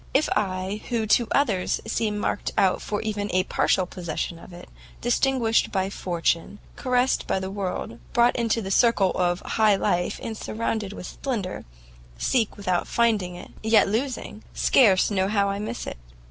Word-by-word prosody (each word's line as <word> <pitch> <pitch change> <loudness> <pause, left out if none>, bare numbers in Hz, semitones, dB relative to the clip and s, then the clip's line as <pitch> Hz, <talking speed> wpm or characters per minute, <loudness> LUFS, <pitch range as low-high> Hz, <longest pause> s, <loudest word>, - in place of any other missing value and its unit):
If 290 - +3
I, 190 0 -1
who, 230 -2 0
to 230 +2 +3
others, 220 -10 +1
seem 220 -1 -1
marked 205 - -1
out 190 -2 +3
for 205 0 -3
even 210 -1 -2
a 185 0 +2
partial 185 - +1
possession 175 -1 -4
of 175 - -13
it, 175 0 -11 0.3
distinguished 240 -2 +2
by 190 0 -1
fortune, 170 +1 -1 0.2
caressed 250 0 +1
by - - +1
the 190 0 -5
world, 185 - -4
brought 240 +1 +4
into 230 -2 0
the 190 - -4
circle 210 -3 +4
of 175 -1 0
high 215 -2 +3
life, 175 -2 0
and 225 - -4
surrounded 220 -2 -3
with 190 - -8
splendour, 210 -4 -4 0.5
seek 230 - 0
without 185 -3 -1
finding 215 -7 +1
it, 175 - -10
yet 220 0 +4
losing, 230 0 -3
scarce 205 -6 +4
know 190 -1 +1
how 200 -1 +1
I 200 0 -2
miss 220 +3 -4
it!" - - -6
205 Hz, 165 wpm, -25 LUFS, 185-230 Hz, 0.5 s, brought